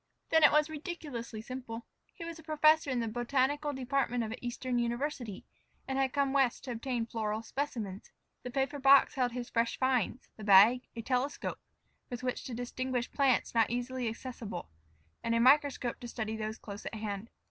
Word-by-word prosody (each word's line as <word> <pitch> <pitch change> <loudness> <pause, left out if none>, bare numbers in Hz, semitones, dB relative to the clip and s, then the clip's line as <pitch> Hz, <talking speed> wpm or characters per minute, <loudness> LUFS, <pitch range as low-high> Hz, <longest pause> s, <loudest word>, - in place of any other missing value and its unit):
Then 320 -1 +5
it 295 - +9
was 300 0 +4
ridiculously 290 - -6
simple. 235 -2 -6 0.3
He 335 - -7
was 335 -1 -7
a - - -13
professor 310 0 +4
in 255 -2 0
the 230 - -1
botanical 265 +6 0
department 260 -2 0
of 220 - -4
an 240 - -7
Eastern 245 0 -2
university, 240 -3 -3 0.4
and 265 - -2
had 265 -1 +2
come 280 -1 +1
West 270 -4 +2
to 260 - -5
obtain 240 0 -2
floral 220 -1 -2
specimens. 225 -7 -4 0.3
The 250 - -6
paper 270 +3 -1
box 275 0 +6
held 250 -3 +1
his 245 -1 -5
fresh 230 0 +1
finds; 260 -1 0
the 215 - -9
bag, 210 +5 +7
a 230 - -5
telescope 255 +4 -1 0.5
with 245 0 -6
which 250 -1 -2
to 245 - -5
distinguish 245 +1 -3
plants 270 -4 +2
not 225 -2 +3
easily 245 0 -2
accessible, 220 - -7 0.5
and 230 - +1
a - - +3
microscope 265 -1 +4
to 240 - -7
study 220 -2 -3
those 220 0 -4
close 200 -1 -8
at - - -5
hand. 210 0 -4
250 Hz, 180 wpm, -32 LUFS, 230-275 Hz, 0.5 s, it